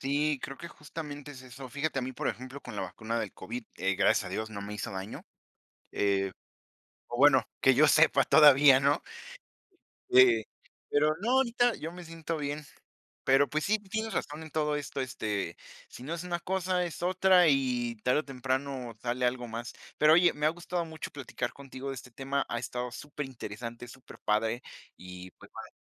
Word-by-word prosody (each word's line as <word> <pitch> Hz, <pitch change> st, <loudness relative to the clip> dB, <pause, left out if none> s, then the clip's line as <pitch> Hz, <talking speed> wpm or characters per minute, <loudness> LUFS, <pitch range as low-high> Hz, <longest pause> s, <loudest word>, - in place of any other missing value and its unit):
Sí, 145 Hz, +2 st, +1 dB
creo 135 Hz, -, -5 dB
que 170 Hz, -, -8 dB
justamente 150 Hz, -2 st, -8 dB
es 130 Hz, -2 st, -10 dB
eso. 130 Hz, +1 st, -10 dB
Fíjate, 140 Hz, +2 st, -2 dB
a -, -, -1 dB
mí, 130 Hz, +1 st, -4 dB
por -, -, -2 dB
ejemplo, 130 Hz, +3 st, -6 dB
con 120 Hz, -4 st, -9 dB
la 100 Hz, -, -2 dB
vacuna 110 Hz, +5 st, -4 dB
del 110 Hz, -3 st, -3 dB
COVID, 115 Hz, +5 st, -7 dB
eh, 95 Hz, +1 st, 0 dB
gracias 100 Hz, +2 st, +3 dB
a -, -, -5 dB
Dios 110 Hz, +4 st, -4 dB
no 100 Hz, -2 st, -6 dB
me 105 Hz, +1 st, -6 dB
hizo 105 Hz, -, -4 dB
daño, 95 Hz, +2 st, -6 dB, 0.7 s
eh, 95 Hz, -1 st, +1 dB, 0.8 s
pero 120 Hz, -, -5 dB
bueno, 135 Hz, -1 st, +6 dB, 0.2 s
que 135 Hz, -, +6 dB
yo 150 Hz, +4 st, +5 dB
sepa 155 Hz, +2 st, +5 dB
todavía, 145 Hz, -3 st, +7 dB
¿no? 140 Hz, +3 st, +2 dB, 1.1 s
Eh, 120 Hz, -4 st, +6 dB, 0.5 s
pero 150 Hz, +1 st, +3 dB
no, 235 Hz, -, 0 dB
ahorita 245 Hz, -2 st, +2 dB
yo 165 Hz, +2 st, -6 dB
me 180 Hz, 0 st, -9 dB
siento 165 Hz, 0 st, -5 dB
bien. 145 Hz, +1 st, -3 dB, 0.6 s
Pero, 135 Hz, +1 st, +5 dB
pues 155 Hz, +3 st, -1 dB
sí, 215 Hz, +2 st, +2 dB
tienes 220 Hz, +2 st, -4 dB
razón 150 Hz, +2 st, -3 dB
en 155 Hz, -, -10 dB
todo 150 Hz, -1 st, 0 dB
esto, 145 Hz, -1 st, -4 dB
este, 105 Hz, -8 st, -3 dB, 0.3 s
si -, -, -11 dB
no 150 Hz, +6 st, -5 dB
es 170 Hz, +1 st, -4 dB
una 175 Hz, -1 st, -2 dB
cosa, 185 Hz, 0 st, 0 dB
es 170 Hz, -, -6 dB
otra, 185 Hz, -1 st, +5 dB
y 125 Hz, -4 st, +1 dB
tarde 125 Hz, +4 st, +3 dB
o -, -, -10 dB
temprano 130 Hz, -1 st, -3 dB
sale 125 Hz, +1 st, -1 dB
algo 125 Hz, -1 st, 0 dB
más. 115 Hz, +1 st, -6 dB, 0.2 s
Pero 155 Hz, +1 st, +6 dB
oye, 175 Hz, +1 st, +5 dB
me 150 Hz, 0 st, -3 dB
ha 155 Hz, -, +5 dB
gustado 175 Hz, +1 st, -3 dB
mucho 160 Hz, -1 st, -7 dB
platicar 130 Hz, -3 st, -5 dB
contigo 135 Hz, -1 st, -8 dB
de 135 Hz, -, -3 dB
este 125 Hz, 0 st, -10 dB
tema, 135 Hz, +3 st, -2 dB
ha 120 Hz, -, -1 dB
estado 125 Hz, +1 st, -4 dB
superinteresante, 120 Hz, -4 st, -7 dB
superpadre, 115 Hz, -2 st, -2 dB, 0.4 s
y, 90 Hz, 0 st, -10 dB
pues, -, -, -17 dB
vale. -, -, -8 dB
135 Hz, 190 wpm, -30 LUFS, 120-155 Hz, 1.1 s, todavía